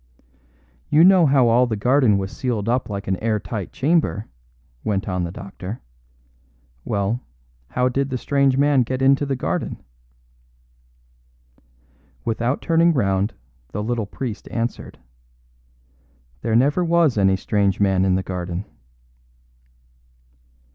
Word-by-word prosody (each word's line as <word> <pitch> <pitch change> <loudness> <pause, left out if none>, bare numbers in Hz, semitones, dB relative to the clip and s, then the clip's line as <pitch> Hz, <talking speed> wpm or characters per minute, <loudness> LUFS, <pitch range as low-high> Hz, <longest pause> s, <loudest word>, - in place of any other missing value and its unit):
"You 155 +2 +5
know 185 -3 +6
how 135 -3 +4
all 120 +2 +4
the 110 - -2
garden 125 0 +3
was 95 -1 -4
sealed 115 -5 -2
up 125 0 0
like 100 -1 -5
an 95 -1 0
air 110 0 0
tight 105 -3 -6
chamber," 145 -7 0 0.6
went 100 -1 -1
on 90 -2 -1
the 85 - -5
doctor. 100 +3 -8 1.0
"Well, 100 +4 -1 0.5
how 125 - 0
did 135 +2 -1
the 130 - -2
strange 140 0 +1
man 140 -1 +4
get 130 +2 -2
into 135 +1 +3
the 135 - -1
garden?" 130 - -3 2.4
Without 120 +4 -1
turning 165 0 +3
round, 100 -3 0 0.4
the 105 - -3
little 115 -2 -2
priest 115 0 -6
answered: 115 0 -4 1.4
"There 110 - 0
never 145 +9 +3
was 170 -5 +3
any 95 -2 +3
strange 100 0 0
man 95 -2 +2
in 95 -1 +2
the 95 - -1
garden." 90 +1 -4
115 Hz, 125 wpm, -22 LUFS, 100-135 Hz, 2.4 s, know